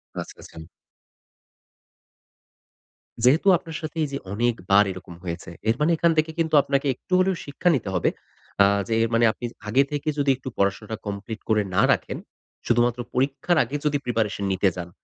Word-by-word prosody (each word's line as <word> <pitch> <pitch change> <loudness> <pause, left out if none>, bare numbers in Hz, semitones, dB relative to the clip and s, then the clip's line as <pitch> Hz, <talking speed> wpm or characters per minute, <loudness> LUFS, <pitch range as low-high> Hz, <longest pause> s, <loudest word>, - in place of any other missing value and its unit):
আচ্ছা, - - -6
আচ্ছা। 80 0 -11 2.6
যেহেতু 145 +10 +4
আপনার 165 -1 -8
সাথে 155 +1 -6
এই - - 0
যে, 140 - -2 0.2
অনেকবার 105 -3 +3
এরকম 90 -1 -10
হয়েছে। 85 0 -5 0.2
এর 115 - +3
মানে 150 +3 +3
এখান 170 +1 +3
থেকে 155 +1 +2
কিন্তু 160 -1 0
আপনাকে 140 0 0
একটু 185 - -8
হলেও 190 0 +2
শিক্ষা 145 +5 0
নিতে 115 -7 -3
হবে। 90 - +2 0.5
আ - - +6 0.2
যে 115 - -1
এর 115 - 0
মানে 115 +1 +4
আপনি 120 - -8 0.2
আগে 130 +6 +4
থেকে 145 +1 -4
যদি 140 -1 +1
একটু 130 0 -7
পড়াশোনাটা 100 +3 -1
কমপ্লিট 100 +2 -5
করে 110 -1 +3
না - - +4
রাখেন। - - -1 0.5
শুধুমাত্র 120 0 +2 0.2
পরীক্ষার 140 +6 +1
আগে 130 +4 -6
যদি 145 -1 +2
প্রিপারেশন 110 -4 -1
নিতে 95 +1 +2
যান, 90 -1 -6
120 Hz, 170 wpm, -24 LUFS, 100-145 Hz, 2.6 s, আ